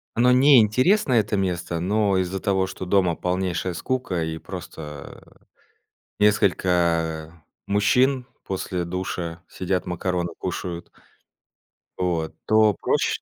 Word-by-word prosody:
Оно 125 +2 +4
не 130 +1 +7
интересное, 130 - +3
это 105 0 -2
место, 90 -3 -2
но 100 +2 +1
из-за 95 +1 -1
того, 95 -1 +1
что 95 0 -7
дома 90 -2 +2
полнейшая 90 0 -2
скука, 95 -3 -2
и 80 0 -3
просто 75 -2 -10 0.8
несколько 85 -5 +1 0.2
мужчин 125 +6 +2 0.2
после 90 -2 -3
душа 85 -1 -4
сидят, 90 0 -2
макароны 90 0 -2
кушают. 90 -1 -5 1.1
Вот, 85 -3 -1
то 110 -2 +4
проще - - 0
95 Hz, 110 wpm, -23 LUFS, 85-105 Hz, 1.1 s, не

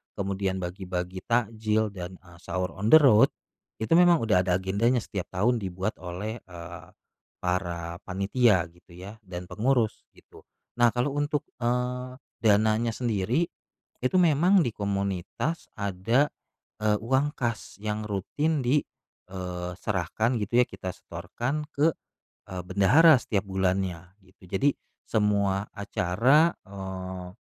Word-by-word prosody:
kemudian 95 -1 -2
bagi-bagi 90 0 -4
takjil 110 -2 +1
dan, 90 -1 -7
eee, 85 -2 -16
sahur 90 0 -3
on 100 +5 -4
the 135 - +8
road, 135 -9 +7 0.6
itu 110 - -5
memang 175 -1 +7
udah 105 -5 +3
ada 90 - +3
agendanya 100 +6 +1
setiap 95 -3 -5
tahun 115 +6 +1
dibuat 95 +1 -3
oleh, 100 +6 -5
eee, 85 -2 -10 0.6
para 85 -2 -2
panitia 100 +1 +3
gitu 85 0 -19
ya 100 +5 -10
dan 90 -2 -7
pengurus 120 -1 0
gitu, - - -18 0.4
nah 120 - +7
kalau 125 +4 +1
untuk, 145 +1 0 0.2
eee, 125 +1 -1 0.2
dananya 110 +2 +3
sendiri, 120 - 0 0.5
itu 130 +7 -1
memang 175 +3 +5
di 120 - -1
komunitas 100 - -3
ada, 100 +8 +1 0.5
eee, 105 0 +2
uang 135 +5 +1
kas 120 -2 -3
yang 105 0 -3
rutin 145 - -1
di 135 +5 +4 0.5
eee, 90 -1 -5
...serahkan 110 +5 0
gitu 115 +4 +2
ya - - -5
kita 95 -1 -6
setorkan 120 - -4
ke, 155 +3 +4 0.6
eee, 90 -1 -4
bendahara 130 - +6
setiap 100 -4 -1
bulannya 95 -1 -1
gitu 95 -1 -19
jadi, 100 +10 +2 0.4
semua 100 -2 +1
acara, 115 - +3
eee, 95 -2 -6
100 Hz, 130 wpm, -27 LUFS, 95-120 Hz, 0.6 s, the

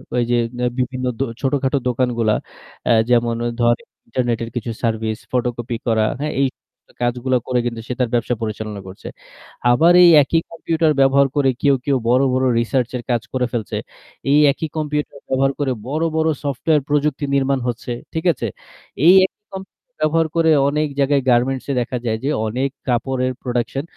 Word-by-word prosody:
ওই 120 - +2
যে - - +3 0.2
অ্যা 125 - +1
বিভিন্ন 130 0 -2
দো - - +2 0.2
ছোটখাটো 135 0 +1
দোকানগুলা, 120 -3 +1 0.5
অ্যা 120 - +4 0.2
যেমন 120 -1 +2 0.2
ধরেন 120 0 +3 0.3
ইন্টারনেটের 115 -1 -1
কিছু 120 -1 -3
সার্ভিস, 110 -1 -1
ফটোকপি 120 -1 -2
করা, 110 -2 +2 0.2
হ্যাঁ? 150 - -2
এই 135 - +4 0.6
কাজগুলা 125 +1 +1
করে 125 -1 +1
কিন্তু 115 -2 -3
সে - - -2
তার 125 -2 +1
ব্যবসা 120 +1 +1
পরিচালনা 110 -1 -4
করছে। 95 +1 -10 0.6
আবার 160 +8 +5
এই 175 - +8
একই 165 +4 +1
কম্পিউটার 165 -1 0
ব্যবহার 135 +1 +5
করে 140 -2 +3
কেউ, 140 -2 +4
কেউ, 140 -2 +2
বড়, 125 +2 +4
বড় 130 +1 +1
রিসার্চের 125 +1 -1
কাজ 120 -2 +1
করে 130 -1 +1
ফেলছে। 115 -4 -3 0.5
এই 145 - +6
একই 160 +3 -4
কম্পিউটার 150 -2 -3
ব্যবহার 135 +1 +2
করে 140 -2 0 0.2
বড়, 155 +4 -1
বড়, 160 0 +2 0.2
সফটওয়্যার 145 +2 +1
প্রযুক্তি 150 0 0
নির্মাণ 135 0 +1
হচ্ছে। 120 0 -4 0.2
ঠিক 160 +2 -3
আছে? - - -4 0.6
এই 175 - +9
একই 190 - -10
কম্পিউটার 190 +6 -11
ব্যবহার 160 +1 +2
করে 165 -1 +3 0.2
অনেক 150 +1 0
জায়গায় 140 0 +3
গার্মেন্টস-এ 130 +3 +1
দেখা 125 +1 -3
যায় 110 -1 0
যে, 140 - 0 0.2
অনেক 130 +5 -1 0.2
কাপড়ের 130 +1 0
production 125 +2 -2
130 Hz, 165 wpm, -20 LUFS, 120-145 Hz, 0.6 s, এই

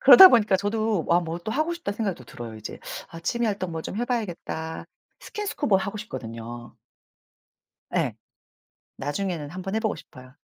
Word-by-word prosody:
그러다 380 -6 +12
보니까 210 - +5
저도 210 -1 0
'와 170 +1 +4
뭐 165 0 -4
또 175 +5 -5
하고 310 +6 +1
싶다.' 340 -11 -3
생각이 205 -3 -1
또 125 - -12
들어요, 115 -1 -8
이제. 110 - -7 0.3
'아 165 - -9
취미 235 +7 0
활동 195 -4 -1
뭐 160 0 -3
좀 195 - -5
해 240 - 0
봐야겠다.' 175 -9 -3 0.4
스킨스쿠버 340 - 0
하고 195 +2 -2
싶거든요. 120 - -7 1.2
예. - - +1 0.8
나중에는 150 +1 -2
1 180 +4 -6
번 195 +3 -3
해 - - +3
보고 220 -2 0
싶어요. 130 0 -13
190 Hz, 340 characters per minute, -26 LUFS, 160-220 Hz, 1.2 s, 그러다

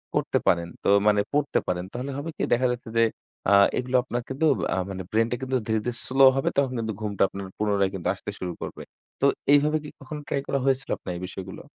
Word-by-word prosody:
করতে - - +1
পারেন 85 -1 +3 0.2
তো - - +2 0.2
মানে 105 -1 +5
পড়তে 145 0 +2
পারেন 90 0 -1
তাহলে 130 +3 -4
হবে 145 +3 -4
কি? - - -1
দেখা 125 +2 +3
যাচ্ছে 120 -1 -5
যে 115 - +6 0.5
আ - - +6 0.2
এগুলো 125 +1 -1
আপনার 120 -1 -3
কিন্তু 135 +4 0 0.3
আ - - -2
মানে 95 -1 -5
ব্রেইন 115 +1 +3
টা - - +1
কিন্তু 130 0 0
ধীরে, 110 -1 +2
ধীরে 120 -1 -2
স্লো 135 +1 +5
হবে 135 - +1
তখন 135 -2 +2
কিন্তু 110 -1 -2
ঘুমটা 105 -2 0
আপনার 100 +1 -7
পুনরায় 100 -2 +1 0.2
আসতে - - -7
শুরু 90 -1 -3
করবে। - - -6 0.4
তো - - +4 0.3
এইভাবে 150 +2 +4
কি 150 - -7
কখনো 150 +2 -7
ট্রাই 140 - -1
করা 140 - 0
হয়েছিল 135 0 +1
আপনার 90 - -6
এই - - -8
বিষয়গুলো? 95 0 -8
120 Hz, 220 wpm, -26 LUFS, 100-135 Hz, 0.5 s, যে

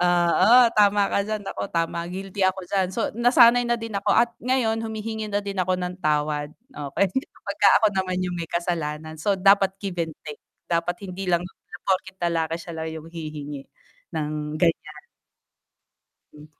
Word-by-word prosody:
Oo, 175 +6 +5 0.2
tama 205 -1 +4
ka 200 - 0
diyan. 215 0 -3
Nako 100 - -5
tama. 170 0 -1
Guilty 190 +2 -3
ako 190 0 +1
diyan. 190 -2 +1
So, 230 - -1
nasanay 240 0 +6
na 240 0 0
din 225 -3 -5
ako 200 - +1
at 235 +1 +4 0.2
ngayon 225 -3 +1
humihingi 220 0 -4
na 205 - +1
din 200 -1 -6
ako 185 0 +1
ng 180 0 -4
tawad 150 0 0 0.4
okey. 200 - +2 0.4
Pagka - - +4
ako 220 - +4
naman 185 -1 -1
yung 180 -1 -2
may 170 - -3
kasalanan 160 -3 -3
so 180 +6 0
dapat 195 0 +5
give 195 -3 -5
and 165 -2 -2
take. 150 -1 -9 0.3
Dapat 170 +1 -1
hindi 185 +2 -5
lang 175 -1 +3
na 180 0 -11
porket 190 0 -1
lalaki 165 -1 0
sila 160 -1 -6
yung 160 0 -8
hihingi 150 -4 -7 0.5
ng 150 0 -3
ganyan. 155 -3 -1 1.3
Hm. 150 0 -13
180 Hz, 165 wpm, -24 LUFS, 160-200 Hz, 1.3 s, nasanay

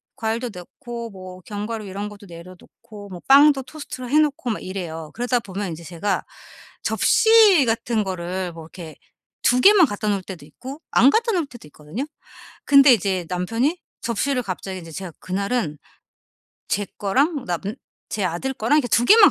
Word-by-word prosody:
과일도 230 +2 -2
넣고 235 +6 -8
뭐 185 -1 -10
견과류 210 +2 -5
이런 200 +2 -5
것도 205 -1 -13
내려 170 +2 -11
놓고 205 -2 -14
뭐 180 -2 -8
빵도 275 0 +6
토스트로 255 -4 -8
해 300 +3 +4
놓고 285 -5 0
막 - - -4
이래요. 165 -5 -6
그러다 245 +1 0
보면 195 -3 -5
이제 165 +1 -8
제가 175 +5 -2 0.6
접시 435 - +5
같은 225 -1 0
거를 185 -1 -4
뭐 165 -1 -10
이렇게 165 -2 -10 0.5
2 250 +1 +4
개만 400 -4 +7
갖다 205 0 -4
놓을 200 -2 +1
때도 175 -7 -9
있고 260 - -10
안 260 - +6
갖다 455 +1 +2
놓을 335 -6 0
때도 240 - -13
있거든요. 150 - -6 0.6
근데 275 -2 +7
이제 185 -4 -1
남편이 230 - -1 0.2
접시를 250 +3 0
갑자기 190 -1 -5
이제 165 -1 -11
제가 185 +1 -6
그날은 190 - -2 0.9
제 205 0 0
거랑 275 - +1
남 175 -2 -2 0.5
제 205 -3 -1
아들 180 +10 -2
거랑 250 +8 +2
이렇게 245 -5 0
2 235 +3 +3
개만 425 - +8
210 Hz, 325 characters per minute, -22 LUFS, 185-265 Hz, 0.9 s, 개만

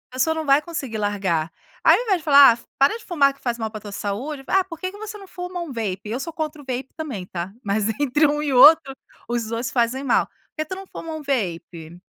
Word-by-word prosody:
A - - -11
pessoa 320 +5 +3
não 320 -1 -4
vai 280 +1 +5
conseguir 290 -8 -5
largar. 195 -6 -1 0.3
Aí, - - +7
ao - - -2
invés, 405 -6 +2
de 330 - -12
falar: 280 -3 +9
"Ah, - - -17
para 275 +11 +3
de 460 - -16
fumar, 280 -6 +3
que 275 - -25
faz 240 -2 -2
mal 220 -2 -4
para 215 - -7
tua 205 -1 -9
saúde. 250 +9 -4
Ah, 385 - +3
por 330 -3 -9
que 370 +3 -4
que 405 - -12
você 430 0 -7
não 395 - -12
fuma 360 -1 -6
um 335 -4 -6
vape?" 205 -6 -3
Eu 235 +4 -2
sou 330 +4 -6
contra 310 -1 -4
o - - -16
vape 260 0 -4
também, 265 - -5
tá, 180 +1 -6
mas, 205 +1 0
entre 290 +2 +3
um 295 +1 -1
e 295 - -1
outro, 275 +2 +7 0.4
os 235 -1 -1
2 230 +2 -3
fazem 245 +2 0
mal. 265 - +2
"Por - - -40 0.2
que 310 - -1
tu 375 - -6
não 385 +1 -9
fuma 330 -3 -8
um 315 - -6
vape? 175 - -3
275 Hz, 265 wpm, -22 LUFS, 220-320 Hz, 0.4 s, falar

